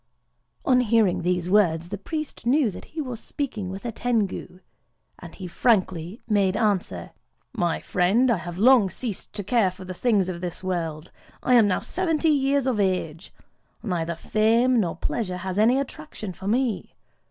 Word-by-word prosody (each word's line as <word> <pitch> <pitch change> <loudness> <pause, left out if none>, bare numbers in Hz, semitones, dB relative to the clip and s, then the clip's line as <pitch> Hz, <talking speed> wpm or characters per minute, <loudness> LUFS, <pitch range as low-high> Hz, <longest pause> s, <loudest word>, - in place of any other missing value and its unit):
On 255 -2 +4
hearing 225 -5 +2
these 180 0 0
words, 175 -4 +2
the 200 - -4
priest 305 0 -5
knew 260 -3 +3
that - - -10
he 315 - -5
was 250 -5 -5
speaking 225 -11 -4
with 195 +4 -7
a 235 - -2
Tengu; 220 -6 -2 0.6
and - - -11
he 190 - -8
frankly 185 -1 0
made 200 -3 +2
answer:—"My 175 - -2
friend, 210 +8 +2
I 225 - +2
have 175 0 -7
long 230 -1 +5
ceased 215 +2 -5
to 205 - -4
care 210 -1 +2
for 185 +1 -11
the 185 - -6
things 205 -2 +1
of 175 -2 -5
this 180 0 -5
world: 165 -3 -3 0.3
I 255 - +3
am 230 -4 +6
now 185 - 0
seventy 330 -3 0
years 280 -2 +2
of 250 -5 0
age; 180 -3 -1 0.5
neither 170 -5 -2
fame 230 +7 +2
nor 175 -6 0
pleasure 185 +1 -3
has 185 +2 -3
any 235 +5 +4
attraction 275 -8 -6
for 190 +2 -8
me. 240 0 -1
205 Hz, 165 wpm, -25 LUFS, 180-245 Hz, 0.6 s, am